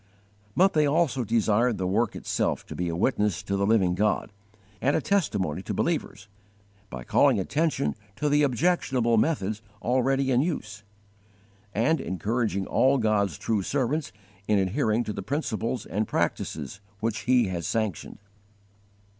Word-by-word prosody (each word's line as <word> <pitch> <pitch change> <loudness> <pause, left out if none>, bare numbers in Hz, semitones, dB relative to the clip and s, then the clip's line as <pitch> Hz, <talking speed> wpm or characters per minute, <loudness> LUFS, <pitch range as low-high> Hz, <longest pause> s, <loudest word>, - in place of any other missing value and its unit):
But 190 +2 +5
they 150 -2 +3
also 140 -4 +1
desired 115 +1 +2
the 95 - -2
work 105 +4 0
itself - - -1
to - - -8
be 90 -1 -2
a 85 - -2
witness 105 -1 0
to 100 - -2
the 100 0 +1
living 100 -5 +3
God, 105 +2 0 0.5
and 140 +3 +2
a - - +3
testimony 120 - 0
to - - -4
believers, 110 +2 -2 0.6
by 60 - -7
calling - - +3
attention 140 - 0 0.2
to 150 - -1
the 145 0 +3
objectionable 130 -4 +2
methods 110 -6 0 0.2
already 130 +3 +1
in 125 0 +4
use 110 - -3 0.9
and 120 +11 +1
encouraging 100 +2 -1
all 135 +7 +3
God's 105 - +1
true 110 -3 -1
servants 140 - -1 0.4
in 105 - +3
adhering 110 +4 +1
to 105 - -4
the 100 - -5
principles 120 -2 -2
and 105 +2 -2
practices 75 +6 -2 0.2
which 105 -2 -2
He 125 -5 +4
has 85 -4 -3
sanctioned. 110 -7 -2
110 Hz, 145 wpm, -26 LUFS, 100-135 Hz, 0.9 s, But